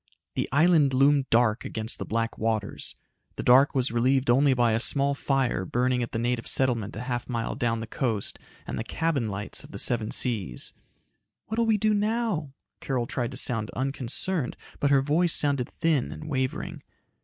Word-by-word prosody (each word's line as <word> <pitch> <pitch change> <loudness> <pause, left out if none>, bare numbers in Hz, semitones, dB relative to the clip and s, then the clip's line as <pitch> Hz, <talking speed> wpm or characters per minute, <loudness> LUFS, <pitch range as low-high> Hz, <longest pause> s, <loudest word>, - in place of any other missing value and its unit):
The - - -2
island 150 -2 +4
loomed 140 +1 +3
dark 115 -1 +3
against 110 +1 -3
the - - -5
black 115 +1 -1
waters. 110 -2 -2 0.4
The - - -4
dark 135 +4 +5
was 130 -2 +1
relieved 125 +2 +2
only 135 +2 +4
by 120 -2 +3
a 110 - +1
small 140 +3 +2
fire 135 -8 0
burning 125 +5 0
at 120 - -3
the - - -2
native 120 0 -1
settlement 120 -6 0
a 105 - -5
half 120 -1 -3
mile 115 -2 -2
down 115 -3 -1
the - - -4
coast, 110 -2 -2 0.3
and - - -4
the - - -2
cabin 140 -3 -1
lights 100 +1 -3
of - - -13
the - - -8
Seven 110 0 +3
Seas. 100 - -1 0.7
"What 220 +2 -3
will 230 - +2
we 220 -1 +3
do 215 +1 +2
now?" 210 - -1 0.3
Carol 125 -3 -2
tried 120 0 -2
to - - -7
sound 115 -3 0
unconcerned, 135 +4 -2 0.2
but 140 - +2
her 140 -1 +4
voice 160 +4 +2
sounded 140 -4 +1
thin 155 -6 0
and 155 - -8
wavering. 130 -3 -3
130 Hz, 185 wpm, -26 LUFS, 115-145 Hz, 0.7 s, dark